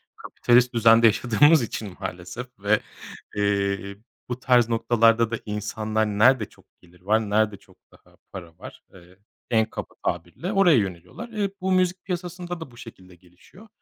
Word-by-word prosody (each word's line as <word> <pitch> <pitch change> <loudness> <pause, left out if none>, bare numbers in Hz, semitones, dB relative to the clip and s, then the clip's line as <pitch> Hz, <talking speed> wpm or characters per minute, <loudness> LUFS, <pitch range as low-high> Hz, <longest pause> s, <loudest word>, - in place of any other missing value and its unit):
kapitalist 125 +1 +1
düzende 115 0 +6
yaşadığımız 125 +7 +4
için 105 -4 -6
maalesef 90 +8 -7
ve, 105 +2 +2 0.6
eee, 100 -1 -1 0.3
bu 125 0 -4
tarz 125 -2 +3
noktalarda 115 0 +2
da 115 - -3
insanlar 110 +1 -2
nerede 110 +3 +3
çok - - -23 0.2
gelir 90 0 -22
var, 110 +3 0
nerede 105 0 +1
çok - - -24
daha - - -24
para 85 -3 -10
var, - - -12
eee, 90 0 -18 0.3
en 110 -2 +3
kaba 110 - -8
tabirle 85 - -3
oraya 185 - +5
yöneliyorlar. 90 - -4
Iıı, 210 -3 -2
bu 190 - -1
müzik 185 0 +1
piyasasında 180 -1 -5
da 160 -6 -9
bu 120 - -18
şekilde 95 -6 -13
gelişiyor. 90 - -20
110 Hz, 150 wpm, -24 LUFS, 100-130 Hz, 0.6 s, düzende